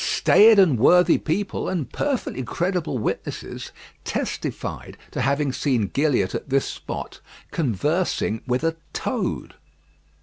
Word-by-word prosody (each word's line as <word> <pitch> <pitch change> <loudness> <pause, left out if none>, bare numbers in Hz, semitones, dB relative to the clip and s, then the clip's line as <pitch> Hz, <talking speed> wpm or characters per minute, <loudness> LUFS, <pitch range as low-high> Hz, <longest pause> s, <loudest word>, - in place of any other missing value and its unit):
Staid 220 +1 +5
and 165 - +5
worthy 180 +7 +5
people, 195 +6 -2
and 165 -9 -2
perfectly 275 - -2
credible 170 +3 -2
witnesses, 105 - -4 0.3
testified - - -4
to - - -3
having 140 0 +1
seen 125 -8 0
Gilliatt 135 -10 +1
at - - -5
this 135 0 +2
spot - - -6 0.3
conversing 145 - 0
with 125 +3 0
a 165 0 0 0.2
toad. - - -3
150 Hz, 115 wpm, -23 LUFS, 130-180 Hz, 0.3 s, Staid